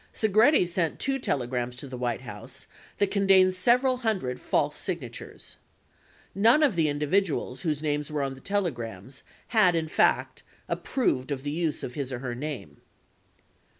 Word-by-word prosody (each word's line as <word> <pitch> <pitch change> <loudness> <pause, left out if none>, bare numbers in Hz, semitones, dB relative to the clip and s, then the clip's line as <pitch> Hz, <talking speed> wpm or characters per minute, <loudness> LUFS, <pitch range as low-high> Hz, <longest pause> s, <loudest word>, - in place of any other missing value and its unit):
Segretti 220 - +4
sent 170 -2 -1
two 270 0 -1
telegrams 125 - -2
to 140 - -5
the 130 - -7
White 120 -2 -2
House - - -8 0.3
that 200 -1 +1
contained 195 -2 +5
several 250 +7 +3
hundred 205 - -2
false - - 0
signatures. - - -6 0.8
None 230 - +5
of 270 -10 +3
the 160 -2 +2
individuals 145 -2 0
whose 155 -3 -1
names 150 -1 -1
were 150 -2 -1
on 135 -1 -2
the 135 - -13
telegrams 130 - -3 0.3
had, 200 -7 +4
in 160 -1 0
fact, - - +1 0.3
approved 135 - -1
of 135 -2 -3
the 145 - -3
use 160 -1 -2
of 125 - -5
his 135 -1 -4
or 130 - -3
her 125 -1 -4
name. 120 - -6
155 Hz, 155 wpm, -27 LUFS, 130-200 Hz, 0.8 s, contained